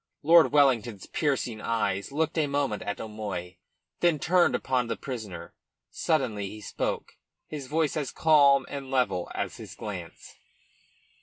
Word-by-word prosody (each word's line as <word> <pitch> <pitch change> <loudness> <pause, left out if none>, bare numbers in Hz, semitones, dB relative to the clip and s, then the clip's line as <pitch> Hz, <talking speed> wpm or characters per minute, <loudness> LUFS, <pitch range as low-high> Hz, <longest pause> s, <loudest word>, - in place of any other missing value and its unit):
Lord 165 +2 +6
Wellington's 120 -8 +2
piercing 130 -7 -1
eyes 105 -2 -1
looked 155 +2 0
a 155 -3 +2
moment 140 -6 -1
at 100 - -4
O'Moy, 100 -5 -5 0.4
then 175 -3 +3
turned 175 +5 +3
upon 130 -2 0
the 115 - -2
prisoner. 105 -10 -7 0.4
Suddenly 125 - 0
he 105 +2 -8
spoke, 105 - -4 0.3
his 145 -4 -7
voice 155 0 0
as 150 -4 -2
calm 140 -4 +5
and 135 -2 -6
level 100 -10 0
as - - -3
his - - -10
glance. - - -8
130 Hz, 140 wpm, -27 LUFS, 105-145 Hz, 0.4 s, Lord